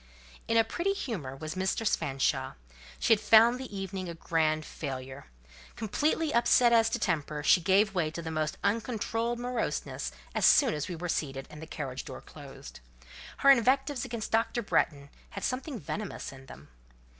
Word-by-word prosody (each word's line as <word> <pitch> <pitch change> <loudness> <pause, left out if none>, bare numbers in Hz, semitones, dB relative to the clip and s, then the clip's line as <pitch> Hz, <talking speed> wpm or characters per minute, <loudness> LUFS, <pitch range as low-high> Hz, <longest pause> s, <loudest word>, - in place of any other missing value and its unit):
In 230 - +2
a 225 - +6
pretty 365 - -1
humour 185 - -5
was 155 +3 -6
Mistress 190 +4 +1
Fanshawe; 135 -4 -1 0.4
she - - +4
had 215 - +2
found 230 +3 +6
the 250 -6 -7
evening 190 -1 -4
a 170 - -6
grand 155 -2 0
failure: 130 - -7 0.5
completely 300 +8 0
upset 235 0 +5
as 225 -1 +5
to 240 - -1
temper, 155 -7 -2
she 175 - +5
gave 195 +4 +3
way 170 -5 0
to 165 +2 -6
the 160 - -4
most 155 -1 -2
uncontrolled 225 +2 -1
moroseness 245 -1 -3 0.2
as - - -1
soon 270 -5 +5
as 150 -1 -3
we 180 - -5
were 175 +2 -5
seated, 135 -5 -2
and 150 - -10
the 160 - -8
carriage 135 -5 -5
door - - -8
closed. - - -12 0.6
Her 275 - +6
invectives 270 +1 +2
against 225 -2 -5
Dr. 230 +1 +1
Bretton 145 -7 0 0.2
had - - -7
something 255 0 -3
venomous 195 +6 -5
in 135 0 -13
them. 70 - -13
195 Hz, 170 wpm, -29 LUFS, 155-235 Hz, 0.6 s, a